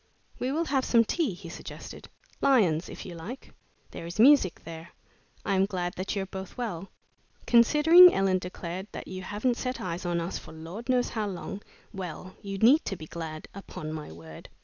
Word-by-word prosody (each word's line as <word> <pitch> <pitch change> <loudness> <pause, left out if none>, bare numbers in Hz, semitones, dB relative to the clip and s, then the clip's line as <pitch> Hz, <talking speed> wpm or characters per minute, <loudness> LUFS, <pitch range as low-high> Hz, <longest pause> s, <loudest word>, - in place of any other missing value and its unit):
"We 255 - -1
will 325 +4 0
have 270 -3 +1
some 230 -2 +4
tea," 280 - 0
he 175 -1 -11
suggested, 170 - -9 0.3
"Lyons', 190 - +3
if - - -8
you 180 - -7
like. 185 +11 -9 0.4
There 165 - -7
is 170 +5 -7
music 250 - +5
there. 165 0 -9 0.6
I - - +1
am 190 0 +3
glad 180 -3 -3
that 190 +3 -3
you 195 - -1
are - - -5
both 190 0 -8
well." 195 -7 -4 0.6
"Considering," 300 +9 +8
Ellen 190 -1 +2
declared, 180 +1 -6
"that - - -7
you 185 0 -6
haven't 210 +6 -1
set 255 0 -3
eyes 175 -1 -4
on 175 -1 0
us 170 +2 -3
for - - -12
Lord 170 +10 -8
knows 250 -1 +2
how 215 -2 -2
long 195 +1 -6 0.3
well, 185 -1 -7
you 195 -1 -5
need 250 +10 +5
to 195 - -2
be 160 - -9
glad. 155 -1 -7
Upon 155 -5 -7
my 155 - -7
word!" 80 -1 -12
190 Hz, 195 wpm, -28 LUFS, 170-235 Hz, 0.6 s, Considering